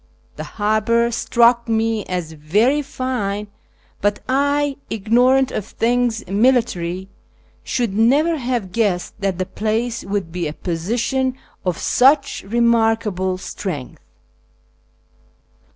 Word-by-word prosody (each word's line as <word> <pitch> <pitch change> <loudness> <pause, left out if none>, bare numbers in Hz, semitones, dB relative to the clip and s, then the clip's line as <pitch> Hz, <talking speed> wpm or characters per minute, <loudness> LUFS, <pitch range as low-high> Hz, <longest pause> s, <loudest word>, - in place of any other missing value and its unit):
The - - -6
harbour 220 +3 +2
struck 235 0 +3
me 225 -1 +1
as 180 -3 -3
very 205 - +1
fine, 235 -7 -3 0.5
but 205 +1 +1
I, 285 +1 +1
ignorant 250 +5 +3
of - - -3
things 230 +1 0
military, 195 -5 +1 0.6
should 235 -6 -1
never 285 +10 +3
have 240 -7 -2
guessed 195 -5 0
that 195 -3 -1
the 185 - -1
place 225 +4 -2
would 195 -4 -3
be 175 -1 -2
a 150 - -5
position 235 +11 -1 0.3
of 180 -3 -1
such 275 +2 +3
remarkable 225 -5 +1
strength. 180 -7 -6
225 Hz, 105 wpm, -20 LUFS, 195-245 Hz, 0.6 s, struck